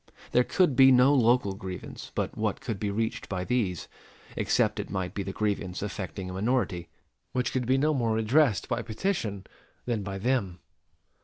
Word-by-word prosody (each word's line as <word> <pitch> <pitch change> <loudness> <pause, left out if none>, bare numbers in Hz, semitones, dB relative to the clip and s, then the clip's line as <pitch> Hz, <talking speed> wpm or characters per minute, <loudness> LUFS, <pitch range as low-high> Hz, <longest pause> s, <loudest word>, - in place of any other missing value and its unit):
There 125 - +4
could 165 -1 +2
be 135 +1 +8
no 130 +2 +6
local 120 -5 +3
grievance 95 -2 -8
but - - -2
what - - -1
could 105 -4 -4
be 105 - -1
reached 110 +2 -2
by 90 -2 -2
these, 100 -6 -1 0.5
except - - +1
it - - -4
might 95 -2 -3
be 100 - -3
the 95 - -4
grievance 100 -3 -2
affecting 95 -2 -5
a 90 - -6
minority, 95 -5 -1 0.4
which 125 0 0
could 125 -2 -1
be 130 +1 +3
no 150 +3 +2
more 115 -5 +1
redressed 115 +1 +3
by 120 -1 -1
petition 110 - -2 0.4
than 115 -4 -1
by 100 -1 -5
them. 105 -5 0
110 Hz, 175 wpm, -28 LUFS, 95-125 Hz, 0.5 s, be